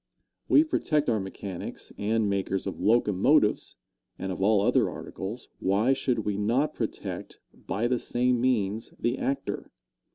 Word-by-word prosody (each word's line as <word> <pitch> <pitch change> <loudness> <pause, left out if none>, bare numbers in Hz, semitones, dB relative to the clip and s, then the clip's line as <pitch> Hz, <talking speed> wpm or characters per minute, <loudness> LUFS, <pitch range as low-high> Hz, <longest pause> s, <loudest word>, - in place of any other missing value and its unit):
We 300 - +7
protect 150 - +1
our 110 - +1
mechanics 95 -1 -6
and 110 +1 +1
makers 95 -1 -1
of 95 - -4
locomotives 105 -4 +3 0.4
and 95 0 -4
of 95 - -5
all 105 +1 +4
other - - +3
articles. 105 +6 -7
Why 105 +7 +3
should 125 -4 -1
we 105 -1 -1
not 120 +9 +1
protect, - - -5
by 110 +5 -2
the 125 0 +1
same 125 0 +1
means, 110 -4 0
the 120 +2 -1
actor? 140 0 -2
110 Hz, 140 wpm, -27 LUFS, 100-125 Hz, 0.4 s, We